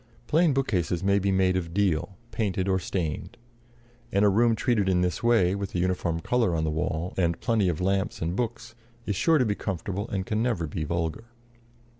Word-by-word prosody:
Plain 160 +4 +3
bookcases 90 - 0
may 100 +1 +3
be 100 0 0
made 95 -1 +2
of 85 -2 -3
deal, 95 -2 0
painted 95 -4 -1
or 95 -1 +2
stained; 85 -3 -4 0.7
and 100 +1 +3
a - - +6
room 115 +3 +3
treated 110 -4 +1
in 90 -1 +2
this 90 +5 -1
way, 115 -7 +3
with 100 -1 -4
a - - +1
uniform 90 -2 0
color 115 -4 +1
on 80 - 0
the 80 - 0
wall, 80 +3 -2
and 85 -2 +1
plenty 110 -6 +1
of 80 - -2
lamps 95 +2 0
and 85 +2 -2
books, 120 0 -3 0.3
is 105 - -1
sure 160 - +3
to 130 - +3
be 105 - +1
comfortable 100 +1 -4
and 95 -2 -2
can 110 +2 -1
never 115 -9 0
be 80 +1 -4
vulgar. 85 +6 -2
95 Hz, 200 wpm, -26 LUFS, 85-110 Hz, 0.7 s, a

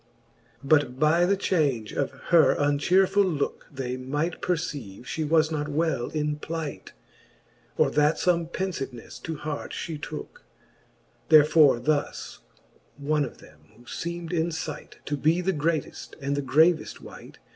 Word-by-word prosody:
But 140 -3 +2
by 165 +3 +4
the 200 +1 +2
change 140 - 0
of 140 - 0 0.2
her 170 -2 +6
unchearfuU 180 +5 +2
looke, - - -3
They 130 -2 -4
might 145 +6 -3
perceive, 145 - -3
fhe 155 +2 -3
was 160 0 +3
not 150 -1 -2
well 150 -4 -1
in 150 -1 -2
plight; 160 -1 -6 0.8
Or - - +3
that 150 +1 +3
fome 170 -2 +1
penfivenefle 140 -12 -5
to 160 - -4
heart 150 -1 -5
flie 160 -2 -4
tooke. 155 - -7 0.9
Therefore 150 -4 +6
thus 145 +3 -2 0.6
one 150 +1 0
of - - -6
them, 75 - -17 0.2
who 120 - -18
feem'd 170 +6 -5
in 165 0 +1
fight 160 -1 -6
To 145 - -1
be 155 +5 +2
the 190 +2 0
greateft 155 -1 -2
and 140 0 -2
the 145 - -1
graved 155 +5 +2
wight. - - -12
155 Hz, 145 wpm, -26 LUFS, 145-165 Hz, 0.9 s, her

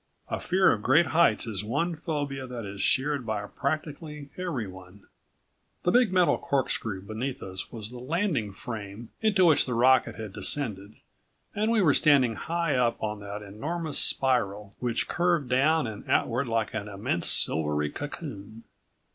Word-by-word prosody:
A - - -2
fear 185 +1 +3
of 105 - -1
great 150 +10 +4
heights 165 -3 +3
is 105 -4 -3
one 165 +11 -1
phobia 145 -4 -4
that 120 -3 -6
is 100 0 -6
shared 140 0 +1
by 110 -3 -3
practically 150 +2 -4
everyone. 100 - -6 0.8
The 175 - +2
big 245 -2 +4
metal 180 -2 +3
corkscrew 115 -7 -1
beneath 115 +6 -4
us 95 0 -5
was 110 -2 -5
the 125 - -8
landing 150 - -1
frame 110 +1 -8
into 205 -4 +4
which 160 -5 +5
the 125 - -1
rocket 125 -2 +4
had 110 -3 -7
descended 105 -8 -1 0.6
and 215 +2 0
we 220 -3 +3
were 150 -5 +5
standing 140 -7 +4
high 170 +5 -1
up 125 -2 +2
on 105 -1 -2
that 100 +1 -7
enormous 150 +11 -2
spiral, 105 -6 +1
which 120 -2 -1
curved 170 -6 +1
down 150 +4 +3
and 110 -2 -7
outward 125 +3 +1
like 115 -3 -1
an 100 - -4
immense 100 -3 -2
silvery 75 -1 +1
cocoon. 115 - -7
125 Hz, 155 wpm, -27 LUFS, 105-155 Hz, 0.8 s, which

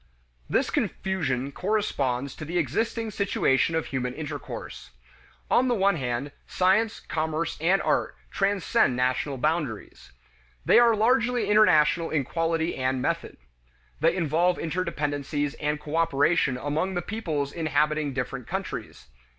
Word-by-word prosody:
This - - +1
confusion 140 -9 -1
corresponds 140 - -1
to - - -7
the 170 +3 -3
existing 220 - -1
situation 165 -6 +1
of 160 - 0
human 125 -2 -3
intercourse. 150 -2 -7 0.6
On 255 - +4
the 245 - +2
one 200 -2 +3
hand, 130 +1 -3 0.2
science, 200 +5 +2
commerce, 160 +1 -2
and 185 +4 +3
art - - 0 0.2
transcend 195 - +1
national 130 +2 0
boundaries. 150 -5 -3 0.5
They - - +6
are 235 -2 +5
largely 240 0 +2
international 165 -5 +4
in 150 -3 0
quality 165 +3 -1
and 130 0 0
method. - - -2 0.6
They 165 +3 +3
involve 175 +1 +1
interdependencies 150 -4 -2
and 150 0 -1
cooperation 150 -3 +1
among 155 +8 -2
the 175 - -1
peoples 155 -10 -3
inhabiting 155 -2 0
different 125 -2 -4
countries. - - -5
160 Hz, 125 wpm, -26 LUFS, 140-190 Hz, 0.6 s, They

